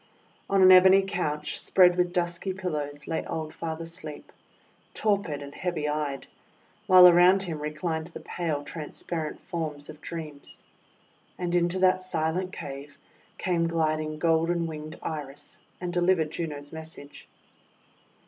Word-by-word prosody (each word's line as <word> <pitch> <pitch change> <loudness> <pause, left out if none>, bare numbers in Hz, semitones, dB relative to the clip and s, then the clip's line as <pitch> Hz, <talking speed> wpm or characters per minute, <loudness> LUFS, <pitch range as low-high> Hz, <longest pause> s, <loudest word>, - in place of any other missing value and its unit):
On 195 -1 +4
an 185 - +9
ebony 190 +1 +8
couch 150 -6 -2
spread 180 -2 +5
with 180 -1 +1
dusky 175 +1 -2
pillows 150 -6 -4
lay 160 - -2
old 160 -1 -5
Father 165 0 -5
Sleep, 165 -3 -10 0.6
torpid 200 -9 0
and 140 0 -10
heavy 170 -4 -2
eyed; 150 -2 -2 0.6
while 185 -1 +9
around 180 +2 +6
him 165 -5 -5
reclined 160 +2 -3
the 170 - -10
pale, 160 -5 -3
transparent 155 +1 -5
forms 155 -4 -5
of 155 0 -16
Dreams. 155 -4 -8 0.7
And 175 -1 -3
into 175 +1 +2
that 185 0 +3
silent 180 +1 -2
cave 140 -1 -8 0.4
came 170 -2 0
gliding 155 -2 -1
golden 165 +1 +1
winged 155 0 -7
Iris, 145 -3 -7 0.2
and 180 -1 -4
delivered 175 -3 +2
Juno's 150 -4 -5
message. 160 -2 -11
165 Hz, 130 wpm, -27 LUFS, 150-180 Hz, 0.7 s, an